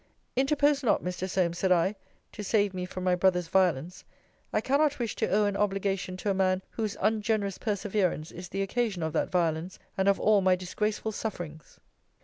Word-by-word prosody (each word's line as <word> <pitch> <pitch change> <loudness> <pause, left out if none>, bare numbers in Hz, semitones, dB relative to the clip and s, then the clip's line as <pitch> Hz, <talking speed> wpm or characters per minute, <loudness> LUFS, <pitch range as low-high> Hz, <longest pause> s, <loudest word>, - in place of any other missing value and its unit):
Interpose 285 +2 +3
not, 240 - +2
Mr. 180 +1 -3
Solmes, 175 -2 0
said 190 - +1
I, 180 +3 +3 0.4
to 210 - -7
save 205 -1 +2
me 180 -1 -3
from 185 0 -6
my 185 -1 +3
brother's 180 -2 +2
violence. 180 -2 +1 0.5
I - - +2
cannot 290 +2 +2
wish 235 -3 -2
to - - 0
owe 210 +2 +3
an 205 -1 0
obligation 195 -2 -1
to 200 +2 -1
a - - +2
man 190 0 +1
whose 215 -3 -3
ungenerous 215 -2 0
perseverance 200 -6 -1
is 180 +1 -9
the 195 0 -1
occasion 200 -3 -1
of 160 -1 -2
that - - 0
violence, 170 0 0 0.2
and 190 - +2
of 200 - +2
all 210 -2 +4
my 185 -1 +4
disgraceful 210 +4 -2
sufferings. 175 -8 -6
190 Hz, 185 wpm, -28 LUFS, 180-210 Hz, 0.5 s, all